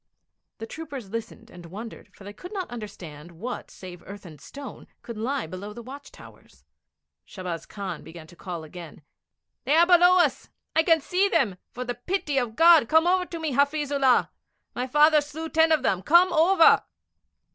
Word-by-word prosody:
The 225 - -7
troopers 275 -6 -9
listened 230 +1 -7
and 175 -1 -12
wondered, 210 +4 -10
for - - -15
they 205 +1 -9
could 360 - -11
not 380 - -5
understand 175 -8 -9
what 230 +10 -7
save 180 -2 -11
earth 200 0 -10
and 155 -4 -13
stone 280 -1 -10 0.2
could 235 - -8
lie 255 +6 -3
below 185 +5 -8
the 235 - -10
watch 275 +4 -11
towers. - - -17 0.6
Shahbaz 180 -4 -7
Khan 200 -2 -6
began 160 0 -12
to 175 - -17
call 175 -2 -7
again: 155 -1 -11 0.6
'They 285 +4 +2
are 335 +1 +6
below 355 +1 +5
us. 315 -7 +1 0.3
I 320 - +5
can 325 -1 +3
see 370 +7 +1
them. 195 - +1
For 250 +1 -7
the 245 - -3
pity 290 - -2
of 235 -3 -4
God 330 -5 +6
come 320 +1 +4
over 365 0 +1
to 340 - -7
me, 315 -2 -3
Hafiz 285 +2 0
Ullah! 270 -3 +2 0.4
My 250 +1 -3
father 300 +3 +4
slew 300 +2 -7
ten 320 0 +3
of 310 -4 +2
them. 190 -7 0
Come 345 - +4
over!' 330 +1 +5
255 Hz, 185 wpm, -25 LUFS, 200-320 Hz, 0.6 s, are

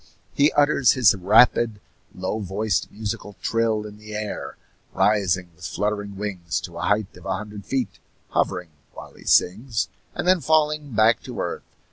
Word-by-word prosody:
He 145 +2 +4
utters 145 -3 +4
his 125 -7 +5
rapid, 110 +3 +4 0.4
low 95 +4 -3
voiced 100 0 -1
musical 105 -1 -5
trill 115 -2 +1
in 105 0 -10
the 105 0 -9
air, 105 0 -5 0.4
rising 95 -4 +2
with - - -17
fluttering 100 -1 -2
wings 95 -3 -3
to 85 -2 -8
a 95 - -1
height 105 -1 0
of - - -11
a 95 - 0
hundred 105 0 -9
feet, 130 -5 -2 0.3
hovering 90 -3 -1 0.3
while - - -10
he - - -16
sings, 110 +5 +2 0.3
and - - -3
then 185 -2 +4
falling 150 -3 +1
back 110 +2 +4
to - - -8
earth. - - -3
105 Hz, 160 wpm, -23 LUFS, 100-115 Hz, 0.4 s, his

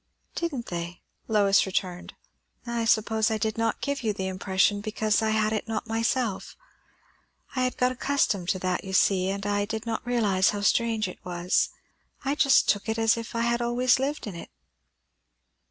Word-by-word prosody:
"Didn't 290 -9 -3
they?" 175 0 -6 0.2
Lois 200 -3 +3
returned. 185 -1 -3 0.5
"I 235 -1 -2
suppose 220 0 +2
I 220 - 0
did 220 0 -1
not 225 0 -1
give 280 0 -2
you 220 -3 0
the 190 -1 -4
impression 190 +2 +1
because 215 0 0
I 220 - +1
had 220 0 +1
it 215 - -2
not 220 -1 -3
myself. 225 -1 -1 1.0
I 255 - 0
had 255 - -2
got 250 0 +2
accustomed 250 -8 0
to - - +1
that, 185 -1 -1
you 190 -1 -7
see; 190 -1 +3
and 200 +1 -3
I 205 0 0
did 220 +1 -5
not 225 -1 -3
realize 210 -6 +2
how 205 -1 -2
strange 225 0 +2
it 180 - -10
was. 175 +1 0 0.6
I 275 - +1
just 275 -2 +4
took 205 +2 +1
it 220 - -1
as 225 0 +3
if 230 0 -7
I 230 - 0
had 235 0 +1
always 245 +2 +2
lived 285 +3 -2
in 205 - -6
it." 170 - -9
220 Hz, 185 wpm, -26 LUFS, 195-235 Hz, 1.0 s, just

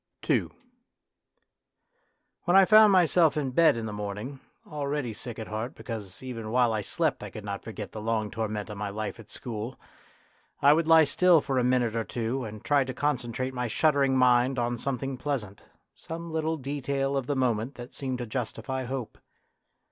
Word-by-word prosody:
II - - +2 2.0
When 175 +2 +5
I 195 - +8
found 215 +1 +7
myself 175 -4 +4
in 140 -3 -1
bed 160 -2 +4
in 115 - -3
the 105 - -5
morn 105 -1 -4
ing, 130 +6 -7 0.3
already 145 -4 -3
sick 115 +2 -7
at 110 - -5
heart 110 +6 -4
because 110 -3 -7
even 115 -4 -6
while 120 0 +3
I 110 - 0
slept - - -1
I - - -6
could 105 - -9
not 100 -1 -4
forget 105 -4 -7
the 110 - -7
long 110 -1 -1
torment 110 -2 -3
of 105 - -7
my 105 -1 -2
life 105 +2 -5
at 110 - -13
school, 115 0 -6 0.8
I 140 +1 +6
would 160 +1 +1
lie 160 -1 +8
still 170 +3 +4
for 135 -2 -1
a - - +1
minute 125 -2 +2
or 115 - 0
two 120 +4 -3
and 105 -1 -9
try 145 -2 +4
to 130 -1 -6
concentrate 130 -3 -1
my 125 -1 -2
shuddering 140 +1 +2
mind 125 +1 +4
on 120 0 -1
something 135 0 -3
pleasant, 120 -8 -4 0.3
some 165 +1 -7
little 160 0 -1
detail 140 0 -2
of 135 -2 -1
the 145 - 0
moment 125 -1 0
that 120 0 -10
seemed 130 -2 -3
to 120 - -4
justify 130 +3 -4
hope. 130 -2 -5
125 Hz, 185 wpm, -28 LUFS, 110-140 Hz, 2.0 s, I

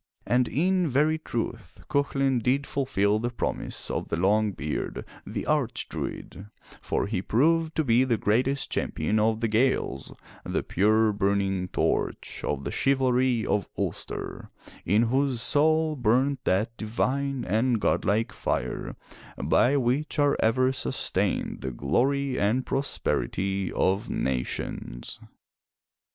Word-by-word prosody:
And 125 0 +2
in 180 +3 +1
very 150 +4 +2
truth 115 - -5
Cuchulain 135 -2 +1
did 135 +4 +1
fulfill 105 -6 +1
the 120 +2 -1
promise 120 - -4
of - - -3
the 80 - -1
long 105 +4 +2
beard, 75 -4 -4 0.2
the - - -4
Arch - - 0
druid, 95 +2 -6 0.3
for - - -1
he 100 -3 -2
proved 160 +10 +2
to 160 - +2
be 120 -1 +4
the 120 -3 +1
greatest 130 +7 +1
champion 105 +8 0
of 110 +1 +1
the 115 - +2
Gaels, 110 - 0 0.3
the - - -2
pure 110 +2 +3
burning 100 -2 0
torch - - -2
of 70 -2 -2
the - - -3
chivalry 130 -3 +2
of 100 -4 0
Ulster, - - -4 0.4
in 105 +6 +4
whose 130 +1 +1
soul 155 +4 +2
burnt 130 +2 +1
that 105 +5 +1
divine 130 +5 -1
and 115 +4 +1
godlike 105 +2 +1
fire - - -3 0.4
by 140 +4 +3
which 135 +6 0
are 145 -1 +3
ever 130 +3 +3
sustained 130 - -1
the 65 - -3
glory 130 - 0
and 115 +6 +1
prosperity 100 -8 -1
of 95 +3 0
nations. 60 -1 -3
120 Hz, 130 wpm, -27 LUFS, 100-135 Hz, 0.4 s, be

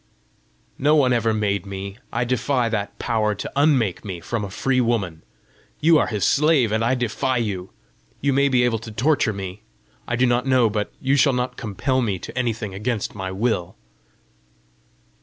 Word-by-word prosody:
"No 150 +3 +4
one 130 -4 +4
ever 115 -1 +2
made 105 -2 -1
me. 100 +2 -6
I 115 - 0
defy 125 0 0
that 105 -3 -3
Power 110 -3 0
to - - -6
unmake 135 - +2
me 95 -4 -5
from 110 +6 -3
a 100 - -4
free 130 +6 +1
woman! 100 -9 -1 0.6
You 160 0 +5
are - - +1
his 105 -3 -1
slave, 145 -6 +3
and 110 +1 +1
I 125 +3 +2
defy 125 +2 -1
you! 100 -5 -3 0.5
You 140 0 +1
may 140 +1 +3
be 125 -2 +3
able 115 -2 +1
to 110 0 -9
torture 130 +1 +2
me 95 0 -6 0.5
I 120 - 0
do 125 +2 +3
not 120 +1 +1
know, 125 -4 +4
but 105 -1 -2
you 135 +1 +1
shall 140 0 +4
not 125 0 -2
compel 130 +4 -1
me 105 -6 -1
to 90 - -9
anything 115 -5 -2
against 105 +2 -2
my 95 -2 -5
will!" 95 -2 -1
115 Hz, 180 wpm, -22 LUFS, 105-130 Hz, 0.6 s, You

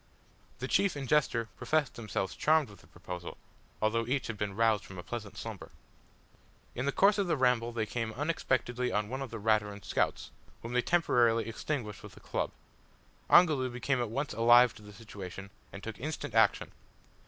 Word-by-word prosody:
The - - -4
chief 200 -5 +2
and 140 -2 -5
jester 120 -5 +2
professed 155 -4 0
themselves 105 -4 -3
charmed 155 -6 +2
with 100 - -15
the - - -20
proposal, 90 -1 -8 0.5
although 115 +1 +1
each 135 +1 0
had 115 - -4
been 100 -1 -3
roused 110 -2 +2
from 95 - -11
a 90 - -7
pleasant 110 0 -7
slumber. - - -7 1.0
In 130 +3 -3
the - - +2
course 200 +6 +4
of 195 - +1
the 165 -3 +1
ramble 125 -2 +2
they 115 -2 -1
came 115 +1 -3
unexpectedly 130 -4 -1
on 105 0 -1
one 130 +2 -4
of 135 - -4
the 115 - -6
Raturan 105 -2 0
scouts, - - -1 0.3
whom 115 +1 -5
they 125 - +3
temporarily 120 -9 +2
extinguished 115 -3 -4
with - - -12
a - - -11
club. - - -2 0.8
Ongoloo 150 -7 +5
became 125 +2 -1
at 120 - -2
once 140 +4 -3
alive 120 +2 +6
to 110 - -15
the 105 0 -12
situation, 100 -3 -9 0.2
and 100 - -9
took 110 -2 -6
instant 145 -3 -4
action. 110 -2 +3
115 Hz, 185 wpm, -31 LUFS, 105-135 Hz, 1.0 s, alive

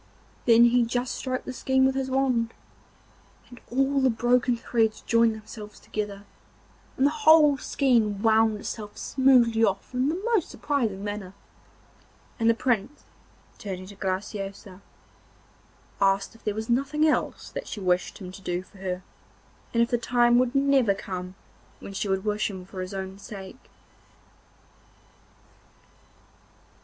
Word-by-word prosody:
Then 235 -1 +7
he 240 +1 +5
just 245 +2 -2
stroked 255 -1 -4
the 255 - -5
skein 265 +1 +2
with 265 - +3
his 265 0 -2
wand, 255 -4 0 1.0
and 245 - -13
all 270 +3 +1
the 265 - +4
broken 240 +1 +2
threads 225 -2 0
joined 230 -1 +3
themselves 215 -1 -10
together, 205 -1 -5 0.7
and 265 - +3
the 285 - +4
whole 305 -1 +6
skein 230 -9 +1
wound 220 -1 +3
itself 210 0 -7
smoothly 245 -4 +3
off 195 +2 0
in 255 +3 +1
the 335 +4 -2
most 400 -8 +2
surprising 225 -10 -2
manner, 205 -2 -5 1.0
and 225 0 +3
the 230 - +4
Prince, 250 +4 -1 0.6
turning 185 -2 -6
to 200 +2 -12
Graciosa, 195 0 -5 1.2
asked 195 0 +2
if 230 - -20
there 210 - -2
was 220 +1 -4
nothing 280 +6 +1
else 305 - -1
that - - -6
she - - -6
wished 180 -2 0
him 185 -2 -8
to 195 - -12
do 180 -1 -3
for 190 +1 -19
her, 185 -1 -4 0.7
and 230 0 +3
if 235 - -3
the 240 - +2
time 240 0 +3
would 255 +1 0
never 275 -7 +3
come 185 -1 -6 0.4
when 195 - -9
she 200 - -2
would 190 +1 -1
wish 210 0 0
for 205 - -6
him 185 -1 -8
for 185 0 -7
his 185 +2 -6
own 190 0 -6
sake. 200 +2 -10
225 Hz, 150 wpm, -26 LUFS, 195-255 Hz, 1.2 s, Then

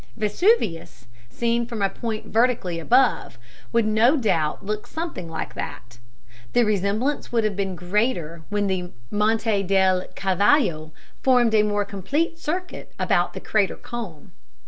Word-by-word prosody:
Vesuvius, 215 - +1 0.2
seen 235 - 0
from 230 -4 -3
a - - +4
point 215 +2 -5
vertically 225 -7 +1
above, 245 - +2 0.3
would 230 -1 +2
no 225 +7 +4
doubt 165 - 0
look 210 +1 -3
something 320 - -5
like 160 - -5
that 120 0 -7 0.5
(the 240 - +4
resemblance 215 +6 0
would 230 -2 +2
have 215 -2 0
been 195 -1 -2
greater 175 -3 -1
when 205 0 0
the 185 -2 -2 0.2
Monte 215 0 +1
del 190 -1 +2
Cavallo 190 - +2 0.3
formed 245 -3 +4
a 215 - +6
more 205 -1 0
complete 280 - -2
circuit 360 +4 -5
about 180 -5 +1
the - - -4
crater 205 -3 0
cone). 200 -11 -8
210 Hz, 140 wpm, -23 LUFS, 185-235 Hz, 0.5 s, a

